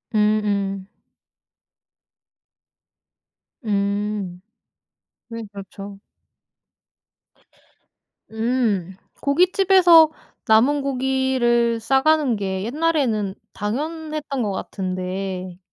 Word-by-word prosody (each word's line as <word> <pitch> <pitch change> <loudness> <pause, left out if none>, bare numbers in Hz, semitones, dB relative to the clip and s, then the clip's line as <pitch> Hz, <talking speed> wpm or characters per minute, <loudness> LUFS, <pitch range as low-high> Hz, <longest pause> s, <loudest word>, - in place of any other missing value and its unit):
음 215 0 +3
음. 195 -2 -2 2.8
음. 200 -2 -2 0.9
네. 230 -1 -6
그렇죠. 200 0 -10 2.3
음. 220 -5 -1 0.3
고깃집에서 355 +1 +5 0.4
남은 255 +7 +4
고기를 260 -3 +1
싸 265 +4 +2
가는 305 -5 +3
게 190 -2 -3
옛날에는 245 -7 0 0.2
당연했던 300 +5 -4
거 205 - -1
같은데. 185 -1 -4
225 Hz, 130 characters per minute, -22 LUFS, 200-275 Hz, 2.8 s, 고깃집에서